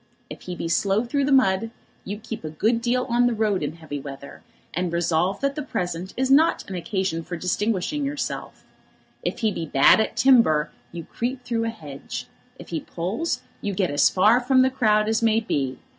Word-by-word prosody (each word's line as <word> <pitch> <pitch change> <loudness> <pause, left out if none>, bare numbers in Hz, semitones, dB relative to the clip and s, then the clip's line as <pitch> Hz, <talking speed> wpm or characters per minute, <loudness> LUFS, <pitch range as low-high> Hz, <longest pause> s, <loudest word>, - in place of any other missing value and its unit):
If - - -8
he 180 - -6
be 165 - -4
slow 195 +5 +1
through 280 +3 0
the 285 - 0
mud, 225 -5 +3 0.4
you 205 - -4
keep 225 -2 -7
a 155 - -4
good 220 +10 0
deal 250 +1 +1
on 240 0 +3
the 240 - 0
road 210 -3 +1
in 145 0 -2
heavy 155 -3 -7
weather, 140 0 -9 0.3
and 175 +1 -1
resolve 175 +3 0
that 275 0 +1
the 300 - -4
present 180 - -4
is 265 +1 +1
not 310 +4 +4
an 195 - -6
occasion 185 -2 -2
for 175 +1 -6
distinguishing 210 - -1
yourself. 285 +1 -4 0.6
If - - -3
he 220 -2 +2
be 165 -4 -4
bad 135 +6 +6
at 220 - -1
timber, 230 - +4 0.2
you 170 -1 -6
creep 250 +8 -4
through 230 -1 -1
a - - 0
hedge. 150 -11 -7 0.3
If - - -12
he 165 - -2
pulls, 230 - -3 0.2
you 200 -2 -3
get 180 -5 0
as 145 - +4
far 215 +6 +4
from 255 +1 +4
the 260 - +2
crowd 215 -5 +2
as 220 +1 +1
may 225 -1 +3
be. 135 - -2
210 Hz, 205 wpm, -24 LUFS, 170-245 Hz, 0.6 s, bad